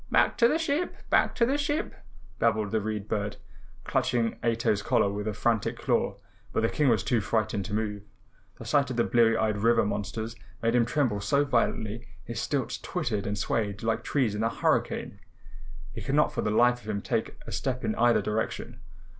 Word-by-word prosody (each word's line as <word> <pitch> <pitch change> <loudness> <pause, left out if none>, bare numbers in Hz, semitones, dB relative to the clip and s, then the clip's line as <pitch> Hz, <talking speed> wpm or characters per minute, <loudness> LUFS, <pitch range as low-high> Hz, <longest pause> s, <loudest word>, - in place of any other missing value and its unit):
"Back - - +3
to 235 - +7
the 305 - +2
ship! 320 +2 -1 0.2
Back - - +3
to 235 - +3
the 275 +4 0
ship!" 295 +2 -1 0.5
babbled 105 -2 +1
the 110 -1 +1
Read 105 -1 -3
Bird, 105 -1 -2 0.5
clutching 115 -2 0
Ato's 115 -3 +1
collar 100 0 +2
with 105 +1 -4
a 105 - -1
frantic 115 -1 0
claw. - - 0 0.3
But - - 0
the 115 - +3
King 150 -3 +2
was 110 -5 +2
too 115 +1 +1
frightened 105 -2 -1
to 105 - -5
move. 105 -2 -2 0.6
The - - -9
sight 140 -2 +2
of 130 - -3
the 115 - +3
bleary 115 -1 +3
eyed 110 -1 0
river 115 +1 +3
monsters 105 +3 -3 0.3
made 115 0 +2
him 120 -1 +4
tremble 120 -6 0
so 140 +9 +2
violently 115 -2 -1 0.2
his 115 +1 -4
stilts 130 -4 -2
twittered 120 - -2
and 100 0 -2
swayed 100 0 -1
like 115 +1 0
trees 130 -7 +1
in 105 - -2
a 115 - +2
hurricane. - - -1 0.7
He - - -6
could 140 - -1
not 150 - +3
for - - -1
the - - 0
life 120 +3 +3
of 110 - -10
him 100 -2 -2
take - - -1
a - - -8
step 130 -2 -2
in 110 - 0
either 120 +1 +3
direction. 105 +1 -3
115 Hz, 200 wpm, -28 LUFS, 105-125 Hz, 0.7 s, to